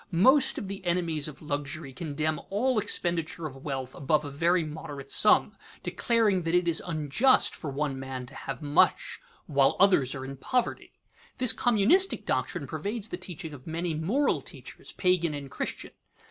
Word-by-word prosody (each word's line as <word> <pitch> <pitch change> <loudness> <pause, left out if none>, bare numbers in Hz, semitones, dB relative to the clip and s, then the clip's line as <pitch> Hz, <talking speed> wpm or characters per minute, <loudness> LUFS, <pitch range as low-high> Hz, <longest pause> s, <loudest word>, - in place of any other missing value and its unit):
Most 260 - +4
of 200 - -4
the 195 0 -7
enemies 170 -4 0
of 150 0 -10
luxury 145 0 -4
condemn 155 +1 -2
all 230 +4 +1
expenditure 170 -4 -2
of 135 -3 -6
wealth 135 -2 -5
above 150 +2 0
a 145 - -6
very 170 +4 +2
moderate 150 -3 -8
sum, 210 - +5 0.3
declaring 225 -6 +1
that 165 +1 -1
it 180 -1 +2
is 170 -1 +2
"unjust" 165 - +2
for 155 - -6
one 140 -1 -2
man 130 -1 -6
to - - -12
have - - -6
much 145 0 +2 0.3
while 140 -2 +3
others 180 -11 +4
are 130 -1 -6
in 135 0 -8
poverty. 250 - -2 0.4
This 250 -3 +5
communistic 245 - +3
doctrine - - -2
pervades 215 +1 -4
the - - -4
teaching 165 -3 -7
of 135 0 -12
many 165 +1 -2
moral 205 - 0
teachers, - - -10
pagan 175 -4 +1
and 140 -2 -8
Christian. - - -4
165 Hz, 165 wpm, -28 LUFS, 145-195 Hz, 0.4 s, sum